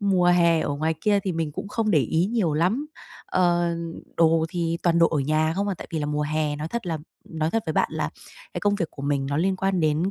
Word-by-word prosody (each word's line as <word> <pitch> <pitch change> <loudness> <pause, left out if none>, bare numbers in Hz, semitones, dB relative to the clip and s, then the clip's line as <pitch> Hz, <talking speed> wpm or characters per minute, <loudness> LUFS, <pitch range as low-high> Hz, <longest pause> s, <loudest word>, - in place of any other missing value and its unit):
mùa 190 -3 +2
hè 170 -2 +4
ở - - -2
ngoài 160 +2 0
kia 205 -1 +3
thì 190 -1 -2
mình 160 -2 -2
cũng 200 - -6
không 220 0 0
để 165 - +5
ý 160 +7 +1
nhiều 205 -8 0
lắm, 190 - +1 0.4
ờ, 175 -1 +2 0.4
đồ 165 -1 +4
thì 170 0 -1
toàn 170 -1 +3
đồ 170 - +5
ở 155 - -1
nhà 155 +3 +1
không 200 +1 0
à. 195 - -1
Tại - - -8
vì 160 - -1
là 150 - -2
mùa 150 0 -1
hè 150 -1 0
nói 155 +2 -4
thật 235 -1 -4
là 165 -2 -2 0.3
nói 160 -1 -2
thật 225 +2 0
với 160 - -1
bạn - - +2
là - - -2 0.4
cái - - -3
công 205 0 +2
việc 170 -6 -2
của 140 - -10
mình 140 -1 0
nó 145 - -1
liên 185 +4 +1
quan 190 -2 0
đến, 155 +4 +1
165 Hz, 260 wpm, -24 LUFS, 155-190 Hz, 0.4 s, để